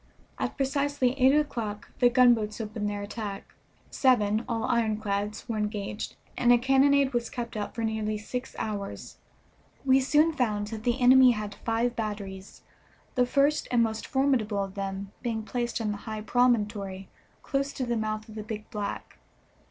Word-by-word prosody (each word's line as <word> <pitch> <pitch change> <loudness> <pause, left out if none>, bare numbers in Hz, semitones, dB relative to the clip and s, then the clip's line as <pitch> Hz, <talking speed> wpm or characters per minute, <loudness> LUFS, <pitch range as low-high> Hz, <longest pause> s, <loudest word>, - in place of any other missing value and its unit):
At - - -2
precisely 280 -1 +1
eight 260 +2 +6
o'clock 230 -9 -2
the 245 - +6
gunboats 235 -4 +4
opened 215 -1 -3
their 205 0 -4
attack. 205 -1 -6 0.4
Seven, 220 -4 +3
all 225 -2 -1
ironclads, 215 -3 -1
were 225 -3 -2
engaged, 210 0 -3 0.2
and 245 - +3
a 245 - +7
cannonade 270 +2 +3
was 240 -1 -1
kept 235 -2 -5
up 210 -1 -4
for 230 - -3
nearly 215 -1 -1
six 250 +5 -6
hours. 205 -2 -5 0.7
We 265 0 +5
soon 300 +4 +3
found 215 -7 0
that 220 -1 -7
the 245 +2 +1
enemy 255 0 +7
had 210 -2 -5
five 230 +3 -1
batteries, 200 -3 -6 0.5
the 250 -1 +2
first 280 +3 +2
and 240 -2 +3
most 220 -1 -3
formidable 245 -7 +1
of 195 -1 -7
them 195 0 -4
being 230 -3 -2
placed 240 +1 -2
on 215 -2 -1
the 205 - -4
high 215 -1 -4
promontory 210 -5 +1 0.4
close 275 0 -1
to 255 - -3
the 240 -1 -1
mouth 215 -1 -2
of 220 - -11
the 215 - -5
Big 215 0 -6
Black. 205 -3 -5
225 Hz, 165 wpm, -28 LUFS, 210-250 Hz, 0.7 s, a